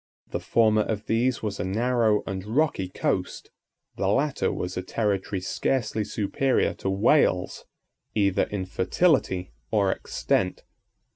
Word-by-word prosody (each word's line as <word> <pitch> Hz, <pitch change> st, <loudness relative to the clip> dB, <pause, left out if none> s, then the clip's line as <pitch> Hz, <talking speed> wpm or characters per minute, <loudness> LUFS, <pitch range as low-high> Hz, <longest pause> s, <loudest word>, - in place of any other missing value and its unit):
The -, -, -2 dB
former 110 Hz, -2 st, +3 dB
of 105 Hz, 0 st, -3 dB
these 120 Hz, +2 st, +1 dB
was 105 Hz, -2 st, -3 dB
a -, -, -1 dB
narrow 110 Hz, +2 st, +1 dB
and 95 Hz, -1 st, -4 dB
rocky 110 Hz, -4 st, 0 dB
coast; -, -, -2 dB, 0.5 s
the 95 Hz, -, 0 dB
latter 135 Hz, -1 st, +1 dB
was 90 Hz, +1 st, -4 dB
a 90 Hz, -, -2 dB
territory 100 Hz, -1 st, -1 dB
scarcely 110 Hz, +2 st, -1 dB
superior 110 Hz, +5 st, 0 dB
to 95 Hz, -, -2 dB
Wales, 95 Hz, -1 st, +2 dB, 0.5 s
either 100 Hz, -3 st, +2 dB
in 100 Hz, -2 st, -4 dB
fertility 95 Hz, -, +1 dB, 0.2 s
or 100 Hz, -3 st, +2 dB
extent. 90 Hz, -1 st, -1 dB
105 Hz, 130 wpm, -26 LUFS, 95-115 Hz, 0.5 s, former